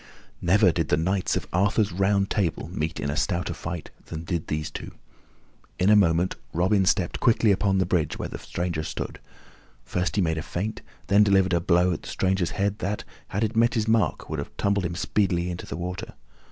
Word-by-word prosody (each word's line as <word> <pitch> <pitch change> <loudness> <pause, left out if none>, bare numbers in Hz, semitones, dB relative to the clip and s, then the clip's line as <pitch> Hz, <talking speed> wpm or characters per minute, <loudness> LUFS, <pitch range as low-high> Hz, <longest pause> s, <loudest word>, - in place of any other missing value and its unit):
Never 95 +2 +4
did 80 -2 -1
the 75 - +2
Knights 95 +3 0
of - - -3
Arthur's 100 +3 +2
Round 100 +2 +2
Table 95 -7 -1
meet 80 -1 -2
in 70 - -1
a - - -3
stouter 90 +1 -1
fight 85 -1 -6 0.2
than 80 0 -6
did 85 -1 -3
these 75 0 -2
two. - - -7 0.8
In 95 +3 +3
a - - +7
moment 90 -2 +3 0.2
Robin 95 +3 +2
stepped 95 -2 +1
quickly 115 -3 +4
upon 100 0 +2
the 95 - +2
bridge 85 -3 0
where - - -3
the - - -7
stranger 85 -2 -3
stood; 80 - -5 0.7
first 90 0 -1
he 100 - +3
made 80 -1 0
a - - -3
feint, 100 +7 -4
and - - -24 0.2
then 100 +1 +5
delivered 95 -2 +3
a 85 - +2
blow 90 +1 +3
at 80 - -5
the - - -9
stranger's 95 -2 0
head 100 +1 0
that, 100 +3 -2 0.2
had 100 +4 -1
it 110 +1 -1
met 115 +1 +3
its 110 0 0
mark, 110 -1 +1
would - - -3
have - - -7
tumbled 100 -2 +1
him 85 0 -3
speedily 90 -1 0
into 85 - -7
the - - -5
water. 90 +1 -5
90 Hz, 210 wpm, -25 LUFS, 85-100 Hz, 0.8 s, a